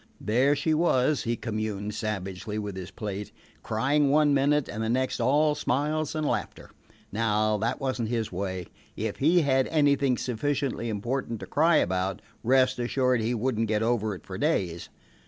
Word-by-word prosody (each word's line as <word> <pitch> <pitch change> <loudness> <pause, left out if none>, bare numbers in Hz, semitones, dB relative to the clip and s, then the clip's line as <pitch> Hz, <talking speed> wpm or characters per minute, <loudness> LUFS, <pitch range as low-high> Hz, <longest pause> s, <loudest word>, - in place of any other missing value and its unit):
There 130 +7 +2
she 155 +2 0
was, 150 -3 +2
he 120 0 0
communed 110 -2 -3
savagely 105 -1 -4
with 105 -2 -4
his 95 -1 -6
plate, 105 -1 -5 0.3
crying 140 +6 +1
one 150 0 +4
minute, 140 +1 +2
and 110 - -5
the 110 - -1
next 130 +2 0
all 145 +5 +3
smiles 150 +2 -1
and 155 -1 -1
laughter. - - -3 0.4
Now 110 0 +1
that 115 +4 -1
was 130 -3 -2
n't 110 - -2
his 115 -2 -1
way. 95 -1 -3 0.3
If - - -3
he 170 +5 +4
had 135 -3 +2
anything 140 -4 +2
sufficiently 130 -1 -2
important 115 +2 -3
to - - -5
cry 160 +3 +3
about, 95 - +1 0.2
rest 130 +1 +3
assured 125 0 +1
he 115 +3 0
would 120 0 -1
n't 115 - +1
get 110 0 +1
over 110 -3 0
it - - -13
for - - -7
days. 85 -2 -1
120 Hz, 175 wpm, -27 LUFS, 105-140 Hz, 0.4 s, one